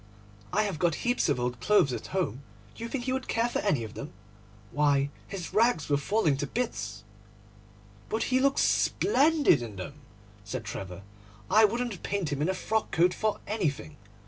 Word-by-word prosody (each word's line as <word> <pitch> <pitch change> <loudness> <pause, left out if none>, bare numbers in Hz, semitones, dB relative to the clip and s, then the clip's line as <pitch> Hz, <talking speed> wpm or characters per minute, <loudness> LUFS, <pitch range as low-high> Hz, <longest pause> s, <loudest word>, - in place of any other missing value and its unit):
I 215 - +2
have 195 -7 -3
got 170 -3 +2
heaps 245 -7 +2
of 140 - +1
old 125 -1 -2
clothes 180 - +3
at - - -5
home—do 115 - -5
you 230 - -4
think 255 -1 -3
he 255 +1 -1
would 260 0 -3
care 230 +1 +1
for 240 - -2
any 150 - +1
of 110 -1 -7
them? 140 - -7 0.6
Why, 145 -1 +2 0.2
his 190 -4 -6
rags 220 -9 +3
were 145 - +3
falling 155 -1 +1
to 145 +1 -2
bits.' 105 - -3 1.1
'But 220 - 0
he 255 - +5
looks 275 +1 +3
splendid 300 - +3
in 115 -4 -6
them,' 140 +10 -8 0.4
said 115 +2 -5
Trevor. 95 -2 -6 0.5
'I 220 0 +7
wouldn't 230 -3 -2
paint 190 -6 -2
him 140 - -3
in 155 - +1
a 190 - 0
frock 220 +3 -1
coat 175 +1 +3
for 215 -1 -1
anything. 160 -8 -2
170 Hz, 180 wpm, -28 LUFS, 135-220 Hz, 1.1 s, I